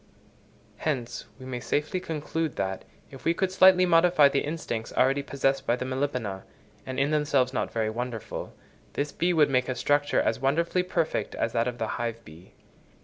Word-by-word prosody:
Hence 130 -6 -3
we 130 - -10
may 130 -1 -4
safely 150 +8 -1
conclude 160 -3 -3
that, 95 -1 -3 0.3
if 135 - -11
we 165 - +2
could 190 +1 0
slightly 185 -1 +6
modify 165 -4 +5
the 140 - +1
instincts 145 -8 -4
already 135 +2 +3
possessed 135 -1 -1
by 120 - +3
the 125 - -4
Melipona, 130 -7 -2 0.5
and 130 0 -3
in 140 +2 +2
themselves 145 -4 +2
not - - -1
very 110 -1 -1
wonderful, 120 -1 -5 0.4
this 145 +1 -2
bee 175 +1 0
would 155 -4 +4
make 125 -1 +1
a 130 - -1
structure 145 +3 +2
as 110 - +1
wonderfully 170 +7 +1
perfect 175 -3 -1
as 115 - -1
that 115 0 +1
of 120 -1 -3
the 115 - -1 0.2
hive 115 -1 -4
bee. 80 +4 -15
135 Hz, 180 wpm, -27 LUFS, 120-155 Hz, 0.5 s, slightly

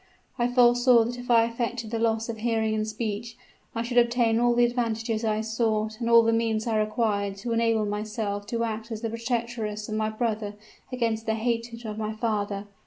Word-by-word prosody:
I 240 - +3
foresaw 245 -1 +5
that 245 +2 -4
if 245 - -9
I 230 -1 +6
affected 230 -1 -3
the 230 - -1
loss 225 0 +1
of 225 -2 -5
hearing 220 -1 0
and 215 0 -1
speech, 220 +1 -4 0.4
I 230 - -1
should 240 +1 +2
obtain 235 -1 +2
all 240 0 +3
the 240 0 +5
advantages 230 -2 -1
I 215 -1 +1
sought 220 -1 -1
and 235 -1 -1
all 230 0 +7
the 225 0 +2
means 225 -1 0
I 225 -2 +1
required 210 -2 0
to 230 +4 -5
enable 230 -1 +2
me 210 0 -2
to 215 +1 -3
act 225 0 -4
as 220 -1 -4
the 225 -2 -2
protectress 230 -2 -3
of - - -3
my 215 0 0
brother 215 -2 -2 0.4
against 230 -3 -1
the 220 - +1
hatred 230 +1 -2
of 215 0 -5
my 215 0 -2
father. 210 -2 -2
225 Hz, 200 wpm, -26 LUFS, 215-235 Hz, 0.4 s, all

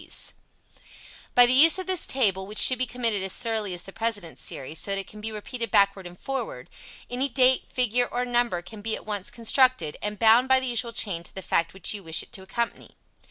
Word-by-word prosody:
] - - -21
By 245 - +9
the 245 - +3
use 315 +7 +7
of 375 - -4
this 370 -1 -2
table, 195 -7 0
which 210 +1 -8
should 255 -2 +6
be 255 - +1
committed 230 -5 -1
as 190 0 -2
thoroughly 220 -5 -2
as 175 - -7
the 195 - -12
President 215 -7 -3
series, 145 +4 -5
so - - -3
that 195 - +1
it 195 - -4
can 210 +2 -12
be 220 +1 -3
repeated 230 +2 -5
backward 200 -2 +2
and 175 0 -14
forward, 270 - -5 0.4
any 255 +3 -1
date, 255 0 +2
figure 245 0 +1
or 245 +1 -2
number 240 -7 0
can 215 +3 -11
be 220 +1 -1
at - - -10
once 205 -3 -3
constructed, 235 - +1
and 210 0 -4
bound 230 +3 +5
by 265 0 +4
the 260 - -3
usual 240 -1 +1
chain 195 -7 -2
to - - -10
the 190 - -6
fact 165 +1 -1
which 190 - -2
you 205 - -5
wish 165 -1 +1
it - - -19
to 200 - -4
accompany. 235 +5 -5
225 Hz, 230 wpm, -25 LUFS, 195-250 Hz, 0.4 s, By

